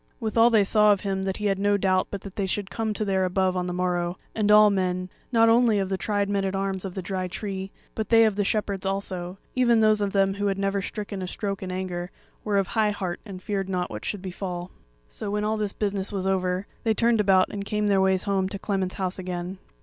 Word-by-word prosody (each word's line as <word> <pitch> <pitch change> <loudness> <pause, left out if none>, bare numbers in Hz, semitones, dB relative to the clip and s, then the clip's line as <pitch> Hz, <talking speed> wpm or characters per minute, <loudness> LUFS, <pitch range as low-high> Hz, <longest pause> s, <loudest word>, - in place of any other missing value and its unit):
Withal 230 0 +4
they 220 -3 +4
saw 210 +1 +5
of 200 - +2
him 195 -1 -2
that 190 0 -2
he 210 - -4
had 195 -1 +1
no 205 0 +3
doubt 185 -1 +2
but 200 - -5
that 200 -1 -10
they 195 -2 -1
should 200 +1 -3
come 225 0 -1
to 215 - -1
their 190 -1 +1
above 185 0 +1
on 180 0 -1
the - - -2
morrow; 175 0 -1 0.2
and 210 -2 0
all 210 0 +8
men, 185 -1 -1 0.2
not 230 -2 +5
only 230 -1 +4
of 195 -1 -1
the 195 - 0
tried 205 0 0
men 200 -1 0
at 195 0 -1
arms 195 -1 -2
of 185 - -6
the 190 - -4
Dry 185 0 -2
Tree, 190 +1 -5 0.2
but 220 -2 -3
they 225 -1 +7
of 215 -2 +1
the 205 - +1
Shepherds 200 -2 -1
also, 190 -2 -3 0.2
even 240 -3 +4
those 215 -1 +4
of 200 -1 0
them 195 -1 +2
who 205 +1 -1
had 195 -1 0
never 195 0 0
stricken 200 -1 -5
a 185 - -3
stroke 195 +1 -3
in 185 -1 -4
anger, 180 -1 -4 0.3
were 205 -2 0
of 195 - +3
high 215 +2 +1
heart 190 -4 -3
and 185 -2 -8
feared 195 -2 -2
not 180 -1 -2
what 105 0 -6
should 200 -3 -4
befall. 180 -1 -5 0.4
So - - -6
when 210 +1 -1
all 215 +1 +1
this 210 -2 -2
business 200 -2 -2
was 195 -2 -3
over, 185 0 0 0.2
they 220 -1 +2
turned 230 0 +3
about 190 -2 +4
and 200 -1 -4
came 210 +1 -1
their 200 -2 +3
ways 190 -1 +2
home 195 -2 0
to 200 - -4
Clement's 190 -2 -2
house 185 0 -3
again. 180 0 -5
195 Hz, 250 wpm, -25 LUFS, 185-210 Hz, 0.4 s, all